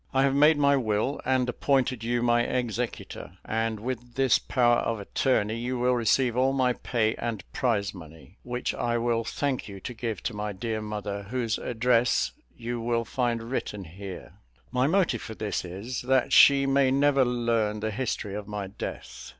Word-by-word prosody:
I 135 - +4
have 135 -1 +3
made 150 +2 +5
my 140 -1 +4
will, 110 +2 -1
and 130 -1 +2
appointed 130 -2 0
you 120 +1 0
my 120 0 +3
executor; 120 -6 -3
and 110 -1 -1
with 120 +1 -5
this 135 -2 +4
power 120 -2 +2
of 115 -2 -1
attorney 110 +1 0
you 125 +2 -2
will 125 +1 +2
receive 120 +1 +2
all 130 +2 +2
my 130 -2 +2
pay 115 -3 0
and 115 -5 -3
prize 105 -5 0
money, 80 +2 -13
which 125 0 -3
I 120 0 -1
will 115 -1 0
thank 135 +1 -2
you 100 -2 -8
to 125 - -6
give 115 -2 -4
to 120 - -2
my 105 0 -3
dear 110 +3 -3
mother, 105 -1 -4
whose 120 -3 -1
address 120 0 +2 0.3
you 120 0 -4
will 115 0 0
find 120 0 -1
written 105 -6 -3
here. 95 +3 -9 0.4
My 130 +1 +2
motive 165 - +2
for 110 - -7
this 105 -1 -2
is, 100 +8 -5
that 130 0 +1
she 140 -1 +7
may 135 -1 +3
never 140 0 +3
learn 115 -3 0
the 110 +1 -2
history 110 -3 -3
of 105 0 -5
my 105 -2 -4
death. 95 - -7
120 Hz, 180 wpm, -27 LUFS, 110-130 Hz, 0.4 s, she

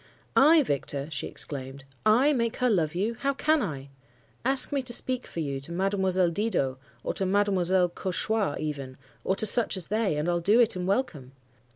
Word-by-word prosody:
"'I, 310 +2 +6
Victor!' 140 - -3
she 135 - -4
exclaimed. 135 -1 -5 0.2
'I 255 +8 +4
make 235 -3 -1
her 250 -2 +1
love 165 -6 0
you? 210 +6 -1
How 275 0 -1
can 305 +2 +2
I? 140 - -5 0.5
Ask 265 +2 +4
me 280 -1 0
to 250 -2 -2
speak 255 +1 0
for 165 - -5
you 140 -3 -4
to 140 - -8
Mademoiselle 190 -1 +1
Didot, 170 -10 -1 0.2
or - - -2
to - - -3
Mademoiselle 190 -2 +2
Cauchois 190 0 -2
even, 140 -4 -5 0.3
or 190 - 0
to 220 - +1
such 220 -2 +3
as 180 - -3
they, 210 -7 0
and 150 +3 -2
I'll 175 0 +1
do 205 +7 +3
it, 235 -4 +3
and 180 0 -4
welcome. 165 - -2
190 Hz, 190 wpm, -27 LUFS, 155-230 Hz, 0.5 s, I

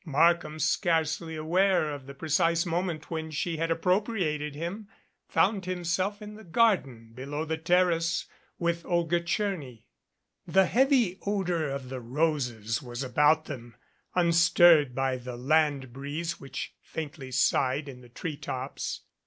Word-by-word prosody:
Markham, 160 0 +2
scarcely 160 -1 0
aware 170 +1 +2
of 140 -2 -8
the 140 - -9
precise 165 +3 +1
moment 170 -2 -2
when 160 -1 -3
she 160 +2 -2
had 165 +1 -1
appropriated 165 -4 0
him, 175 +7 -5 0.4
found 195 -4 +2
himself 185 +3 -2
in 210 0 -8
the 220 +1 -12
garden 165 - +1
below 140 +5 -4
the 160 0 -3
terrace 170 0 +2 0.3
with 170 -1 -1
Olga 170 -1 +1
Tcherny. 170 - -3 0.6
The 190 0 +4
heavy 240 - +3
odor 180 -6 0
of 135 -2 -5
the 130 -1 -5
roses 125 -3 -1
was 120 0 -5
about 150 +5 +3
them, 120 -2 -8 0.4
unstirred 170 -5 +5
by 135 -1 0
the 125 -1 -7
land 140 -1 +1
breeze 150 +5 -4
which 135 - -6
faintly 150 -4 -7
sighed 135 +3 +2
in 125 -2 -9
the 120 - -15
treetops. 135 -1 -5
160 Hz, 135 wpm, -28 LUFS, 140-175 Hz, 0.6 s, unstirred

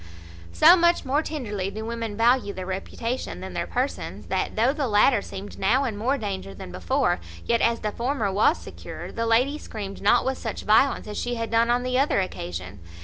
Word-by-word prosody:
So 335 +3 +7
much 345 -2 +3
more 280 +3 +2
tenderly 210 -12 -4
do 220 +2 -6
women 230 -2 -4
value 235 -2 +3
their 185 -1 -6
reputation 230 +7 -4
than 190 0 -7
their 170 -1 -2
persons, 255 +3 -3
that, - - -1
though 235 +5 +3
the 290 -3 -1
latter 210 +1 +4
seemed 200 +1 -8
now 240 +8 +3
in 235 -6 -2
more 250 +7 0
danger 195 - -5
than 90 - -9
before, 85 -1 0 0.3
yet, 235 -1 +2
as 230 0 +2
the 210 - -1
former 235 -3 -1
was 215 - +3
secure, - - -9
the 230 0 -2
lady 255 +6 +2
screamed 200 -7 -7
not 200 - +4
with 265 0 -1
such 225 - -5
violence 220 +6 +3
as 210 - -4
she 245 0 -2
had 230 -1 -4
done 230 +1 +3
on 245 +1 +2
the 255 0 +1
other 275 -6 +2
occasion. 90 - -5
230 Hz, 205 wpm, -25 LUFS, 200-255 Hz, 0.3 s, So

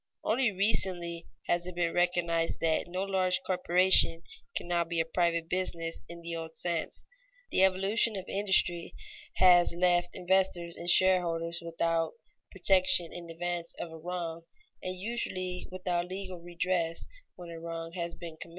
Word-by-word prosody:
Only 235 +1 +2
recently 180 -4 0 0.2
has 175 +1 0
it 180 - -6
been 170 -1 0
recognized 175 -2 +1
that 165 0 +1
no 185 +2 -2
large 185 -2 +1
corporation 180 -2 +3 0.3
can - - -1
now 175 -1 +2
be 170 0 -2
a 165 - +2
private 170 0 +1
business 170 -2 -2
in 170 0 -9
the 170 0 -4
old 160 0 -6
sense. 170 -2 -1 0.5
The 190 - +4
evolution 195 +4 +3
of 190 -1 -5
industry 190 -4 +1 0.4
has 175 -2 +6
left 175 0 +2
investors 180 -2 +1
and 175 - -4
shareholders 170 -2 +3
without 165 -1 0 0.4
protection 185 -2 +3
in 170 -1 -8
advance 170 0 -3
of 170 - -5
a 160 - -8
wrong, 170 -1 -4 0.4
and 185 0 -4
usually 185 -4 -3
without 180 -1 -1
legal 185 -1 -6
redress 170 -1 -1 0.3
when 175 -1 -9
a 165 - -7
wrong 165 0 -5
has 170 -1 -4
been 165 -2 -9
committed. 165 - -7
175 Hz, 150 wpm, -30 LUFS, 170-185 Hz, 0.5 s, has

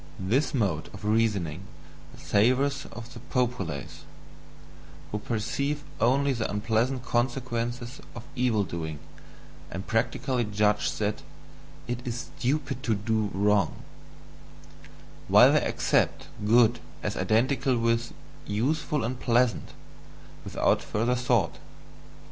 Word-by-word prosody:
This 115 +10 +1
mode 100 - 0
of 105 - -9
reasoning 105 -7 +1 0.6
savours 135 +6 +2
of 120 +2 -9
the 120 - -9
POPULACE, 105 - -2 1.1
who 105 - -2
perceive 140 +7 -2 0.2
only 135 +4 +3
the 115 -3 -2
unpleasant 115 +5 0
consequences 120 0 -2
of 120 - -7
evil 120 -4 +2
doing, 80 -3 -5 0.7
and 95 +2 -6
practically 125 +3 0
judge 105 0 +1
that 105 0 -2 0.7
"it 120 0 -2
is 120 0 -5
STUPID 135 0 -1
to 115 -5 +1
do 110 0 0
wrong"; 100 +1 +1 1.4
while - - +7
they - - +4
accept - - +1 0.2
"good" 120 +1 +5 0.2
as 105 - -2
identical 130 +3 +2
with 115 0 +1 0.4
"useful 145 +6 0
and 125 +2 -3
pleasant," 120 -1 +2 0.7
without - - +1
further 115 +4 0
thought. 125 0 +1
120 Hz, 110 wpm, -27 LUFS, 105-125 Hz, 1.4 s, while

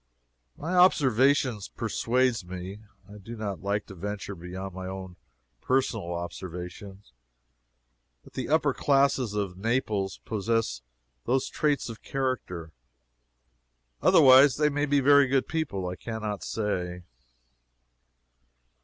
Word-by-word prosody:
My 165 +5 -4
observation 135 - +4 0.2
persuades 125 -2 +1
me 90 +3 -7 0.3
(I 105 +1 -12
do 115 +4 -9
not 105 -4 -5
like 100 +1 -1
to 95 - -11
venture 100 +2 -5
beyond 95 +2 -7
my 95 0 -6
own 95 -1 -7 0.5
personal 120 -8 0
observation,) 90 +3 -7 1.2
that - - -17
the - - -4
upper - - +3
classes 135 -5 +2
of 95 -3 -3
Naples 105 -3 -1
possess 110 - -1 0.4
those 130 +2 +1
traits 150 -3 0
of 115 -2 -8
character. 125 -12 -3 1.3
Otherwise 130 0 +7
they 150 0 +3
may 145 +1 -1
be 145 0 +3
very 140 0 +6
good 135 0 +1
people; 140 - -2
I 90 0 -5
can 110 +5 -6
not 105 -2 -3
say. 90 -5 -3
105 Hz, 120 wpm, -27 LUFS, 95-130 Hz, 1.3 s, Otherwise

